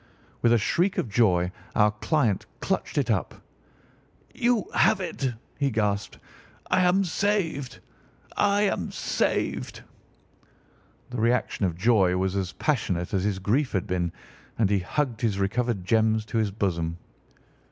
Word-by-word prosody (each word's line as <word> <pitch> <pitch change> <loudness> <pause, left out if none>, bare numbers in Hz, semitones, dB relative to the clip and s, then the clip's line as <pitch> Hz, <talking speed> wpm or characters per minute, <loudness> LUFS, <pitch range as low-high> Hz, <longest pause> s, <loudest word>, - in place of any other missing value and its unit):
With 120 - +4
a 120 - +6
shriek 175 - +1
of 120 - -1
joy 95 -5 +3 0.2
our 105 0 +4
client 110 - 0
clutched - - -2
it - - +2
up. - - -1 1.0
"You 240 -3 +1
have 215 - +4
it!" 140 -8 -2 0.3
he 140 -1 +2
gasped. 105 -4 -1 0.5
"I 185 - +4
am 180 +2 +4
saved! 175 - -1 0.5
I 205 0 +3
am 140 - 0
saved!" - - -1 1.3
The 125 -2 -3
reaction 115 -4 +1
of 85 -2 -4
joy 95 -3 +3
was 95 +1 0
as 95 -2 -2
passionate 100 - -1
as 95 -2 +1
his 105 -2 0
grief 120 +9 0
had 95 0 0
been, 90 -3 -1 0.5
and 105 -3 +2
he 100 - +3
hugged 120 +5 -2
his 110 -5 +1
recovered 100 0 -1
gems 110 +1 +2
to 115 +1 -1
his 110 -2 +1
bosom. 85 -5 -2
110 Hz, 140 wpm, -26 LUFS, 95-140 Hz, 1.3 s, a